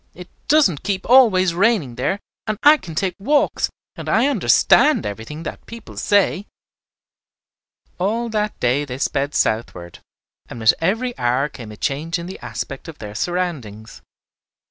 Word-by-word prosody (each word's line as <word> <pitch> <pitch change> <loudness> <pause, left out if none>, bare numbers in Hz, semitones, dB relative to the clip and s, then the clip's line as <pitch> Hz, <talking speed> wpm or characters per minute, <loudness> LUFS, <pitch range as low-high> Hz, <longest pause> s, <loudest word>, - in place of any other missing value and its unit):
"It 180 0 -11 0.2
doesn't 280 - +3
keep 195 -2 -3
always 210 -8 +5
raining 185 - +1
there, 135 +11 -2 0.3
and 215 -1 -1
I 300 +1 +8
can 165 - -10
take 185 +2 -1
walks, 290 +9 +1 0.3
and - - -7
I 225 +4 +3
understand 215 - +4
everything 110 +10 -6
that - - -7
people 230 0 -11
say." 205 -1 +1 1.5
All 225 +6 -1
that 210 -1 -2
day 125 +4 +1
they 130 -3 -6
sped 140 +1 -1
southward, 90 -6 -2 0.5
and 120 - -8
with 110 -1 +5
every 225 +9 -1
hour 125 +4 +1
came 115 -7 -10
a 105 - -11
change 155 - -2
in 170 - -7
the 185 - -8
aspect - - -6
of 160 -2 -9
their 105 -1 -8
surroundings. 130 - -4
175 Hz, 150 wpm, -20 LUFS, 125-210 Hz, 1.5 s, I